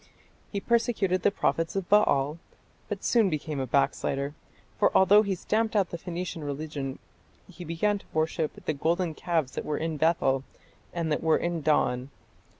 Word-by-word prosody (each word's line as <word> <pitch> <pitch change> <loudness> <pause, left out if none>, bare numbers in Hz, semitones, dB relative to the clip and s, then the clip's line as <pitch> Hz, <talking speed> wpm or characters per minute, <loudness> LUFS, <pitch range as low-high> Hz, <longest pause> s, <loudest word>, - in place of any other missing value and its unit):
He 200 - -2
persecuted 220 -4 +1
the - - +4
prophets 165 -4 -1
of 195 -3 -2
Baal, 150 -7 +3 0.5
but 205 -2 -4
soon 225 -5 +3
became 155 -2 -3
a 130 - -2
backslider, 140 +1 0 0.5
for - - +4
although 200 +3 +7
he 200 -3 -1
stamped 220 +4 -1
out 195 -4 +2
the 170 - -4
Phoenician 175 -1 -5
religion 145 -2 -4 0.5
he 180 -1 -10
began 190 +5 0
to - - -19
worship 155 0 -2
"the 155 - 0
golden 165 +3 0
calves 160 -4 -1
that - - -4
were 150 - -2
in 160 -1 -2
Bethel 140 -4 +2 0.5
and 170 -2 -2
that 150 - 0
were 160 -1 +3
in 170 -1 -2
Dan.... 130 -4 +1
165 Hz, 165 wpm, -28 LUFS, 150-190 Hz, 0.5 s, although